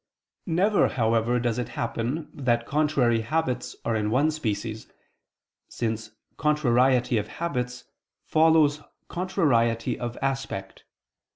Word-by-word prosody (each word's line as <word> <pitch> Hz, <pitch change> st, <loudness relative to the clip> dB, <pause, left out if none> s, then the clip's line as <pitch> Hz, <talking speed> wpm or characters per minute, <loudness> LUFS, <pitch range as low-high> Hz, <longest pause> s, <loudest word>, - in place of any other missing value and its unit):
Never, 190 Hz, +5 st, +3 dB
however, 115 Hz, 0 st, +1 dB
does 120 Hz, 0 st, -1 dB
it 125 Hz, -, -3 dB
happen 120 Hz, +7 st, -2 dB
that 120 Hz, -4 st, 0 dB
contrary 140 Hz, -6 st, +2 dB
habits 130 Hz, 0 st, -2 dB
are 115 Hz, -, +1 dB
in 105 Hz, -1 st, 0 dB
one 140 Hz, +7 st, +3 dB
species: 110 Hz, -6 st, -3 dB, 0.8 s
since 110 Hz, -1 st, -3 dB, 0.3 s
contrariety 125 Hz, -5 st, +3 dB
of 105 Hz, -, -4 dB
habits 125 Hz, -7 st, -3 dB, 0.4 s
follows 155 Hz, -2 st, +4 dB, 0.3 s
contrariety 140 Hz, -, +1 dB
of 120 Hz, 0 st, -4 dB
aspect. 135 Hz, -8 st, -4 dB
125 Hz, 105 wpm, -26 LUFS, 115-150 Hz, 0.8 s, follows